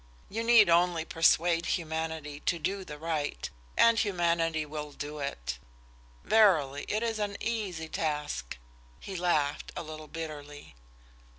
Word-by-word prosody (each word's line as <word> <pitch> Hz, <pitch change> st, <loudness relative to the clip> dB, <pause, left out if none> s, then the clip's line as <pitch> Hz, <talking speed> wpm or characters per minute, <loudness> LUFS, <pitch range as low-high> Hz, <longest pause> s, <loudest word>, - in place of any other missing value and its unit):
You 225 Hz, +3 st, -2 dB
need 230 Hz, -3 st, +7 dB
only 170 Hz, -1 st, +3 dB
persuade 165 Hz, +1 st, +3 dB
humanity 160 Hz, -3 st, -4 dB
to 170 Hz, -, +3 dB
do 190 Hz, +5 st, -2 dB
right, 150 Hz, -, -2 dB, 0.3 s
and 230 Hz, -1 st, +6 dB
humanity 170 Hz, -5 st, +1 dB
will 150 Hz, -1 st, -6 dB
do 150 Hz, +2 st, -6 dB
it. -, -, -4 dB, 0.6 s
Verily, 160 Hz, -11 st, +4 dB
it 215 Hz, +2 st, 0 dB
is 225 Hz, -2 st, -1 dB
an 205 Hz, -1 st, -2 dB
easy 200 Hz, -8 st, -3 dB
task!" 150 Hz, -, -3 dB, 0.4 s
He 195 Hz, -, -7 dB
laughed, 155 Hz, -5 st, 0 dB
a -, -, -4 dB
little 155 Hz, -1 st, -8 dB
bitterly. 150 Hz, -, -8 dB
160 Hz, 125 wpm, -30 LUFS, 150-185 Hz, 0.6 s, need